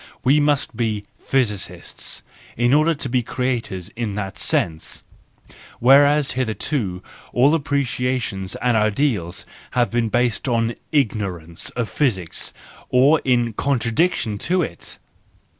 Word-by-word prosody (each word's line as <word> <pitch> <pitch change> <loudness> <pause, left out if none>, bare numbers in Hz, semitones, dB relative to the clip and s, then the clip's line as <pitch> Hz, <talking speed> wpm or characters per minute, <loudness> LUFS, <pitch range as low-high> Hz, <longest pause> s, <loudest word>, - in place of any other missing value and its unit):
We 140 +4 +5
must 145 -4 +1
be 110 -3 -1 0.2
physicists 115 -7 -3 0.3
in 120 +2 +3
order 155 +3 +4
to 140 - -4
be 125 0 +1
creators 120 -7 -2
in 115 -3 -4
that 100 -2 -4
sense,—whereas 135 - +1
hitherto 110 -5 -2 0.3
all 135 +5 +5
appreciations 125 -9 -1
and 125 -1 +1
ideals 105 - 0 0.3
have 120 -1 +3
been 120 -1 +1
based 120 +2 +1
on 115 -1 +1 0.2
ignorance 100 - -1
of 120 -2 -1
physics, 100 - -1 0.4
or 140 +5 +5
in 120 -3 +2
contradiction 120 - 0
to 180 - +1
it. 85 - -6
120 Hz, 110 wpm, -21 LUFS, 105-140 Hz, 0.4 s, We